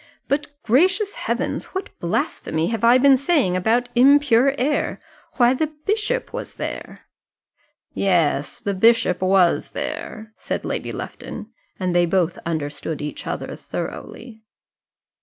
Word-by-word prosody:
But, 285 +1 0 0.2
gracious 375 - +2
heavens! - - -3
what 380 - -4
blasphemy 165 -1 -1
have 225 -2 -3
I 240 +2 +7
been 270 +1 +6
saying 275 - +1
about 225 +7 +1
impure 275 0 +5
air? 285 +4 0 0.3
Why, 245 -1 +4
the 305 +3 -2
bishop 435 +4 -1
was - - -6
there!" - - -6 0.9
"Yes, 165 -7 +1
the 200 - -2
bishop 225 -2 +3
was 185 -2 +3
there," 220 0 -5
said - - -4
Lady - - -3
Lufton, - - -7 0.3
and 185 -2 -1
they 175 0 +3
both 175 -1 0
understood 155 -1 -3
each 150 0 -6
other - - -4
thoroughly. 225 -3 -7
230 Hz, 125 wpm, -22 LUFS, 180-280 Hz, 0.9 s, I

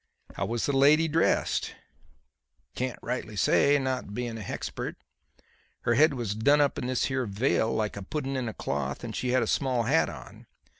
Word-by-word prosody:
"How - - -3
was 115 0 -1
the 140 - 0
lady 150 +4 +5
dressed?" 160 +2 +1 1.0
"Can't 130 0 -3
rightly 120 -3 -4
say, 140 +7 +4
not 130 -6 -3
being 120 -2 -3
a 110 - -6
hexpert. 100 - -5 0.9
Her 120 - +1
head 150 +4 +4
was 115 -5 -2
done 140 +8 +3
up 145 -1 +2
in 125 - -3
this 130 -1 0
here 130 -3 -1
veil 110 +2 +1
like 110 -1 -1
a 100 - -6
pudden 135 +6 -4
in 125 -3 -2
a - - -7
cloth 70 -1 -3
and - - -5
she 125 - -2
had 125 -1 +3
a - - 0
small 125 0 0
hat 140 +8 +2
on. - - -11
125 Hz, 190 wpm, -28 LUFS, 110-140 Hz, 1.0 s, lady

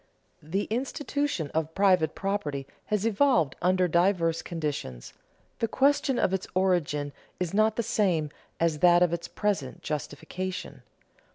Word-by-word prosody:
_The 185 +7 -2
institution 270 - -2
of 160 0 -2
private 185 -5 +3
property 155 -9 -2 0.2
has 210 0 -1
evolved 210 - +3
under 185 +1 +3
diverse 170 -1 +2
conditions; 145 - -5 0.5
the 230 - +1
question 270 +1 +2
of 185 - +1
its 190 - -2
origin 160 -6 +1 0.3
is 180 -1 -2
not 215 +1 +3
the 235 - 0
same 185 -10 +1 0.3
as 165 -2 +1
that 175 +1 +6
of 175 -1 +1
its 170 0 -3
present 195 -11 -2
justification. 165 +5 -5
180 Hz, 130 wpm, -27 LUFS, 160-205 Hz, 0.5 s, that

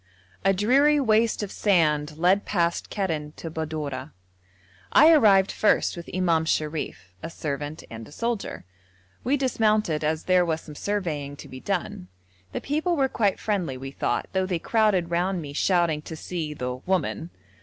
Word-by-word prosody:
A 195 - +4
dreary 270 +10 +4
waste 225 -3 +2
of 200 - -5
sand 155 -6 +1
led 185 +4 +3
past 170 -3 -1
Kerren 160 -7 -3
to 165 - -7
Badorah. 155 -4 -4 0.8
I 310 +4 +7
arrived 200 -9 +5
first 215 - +2
with 170 -1 -8
Imam 170 -3 +1
Sharif, 150 - -3
a - - -5
servant, 150 -1 -5
and 115 -1 -9
a - - -15
soldier. 230 - -3 0.6
We 270 +5 +2
dismounted, 215 - +1
as 155 +1 0
there 185 -1 +4
was 160 -2 -1
some 150 - -11
surveying 150 -6 -3
to - - -11
be 130 - -9
done. 175 - -3 0.4
The - - -4
people 315 +5 0
were 270 -3 +2
quite 205 -6 +1
friendly, 185 -11 -1
we 135 +1 -7
thought, - - -1
though 190 -1 +1
they 180 -2 0
crowded 195 -3 +1
round 180 +2 0
me 145 -3 -7
shouting 170 -1 +2
to 160 - -8
see 155 -2 -5
the 125 -2 -3
'woman.' 175 +2 -2
175 Hz, 165 wpm, -25 LUFS, 150-205 Hz, 0.8 s, I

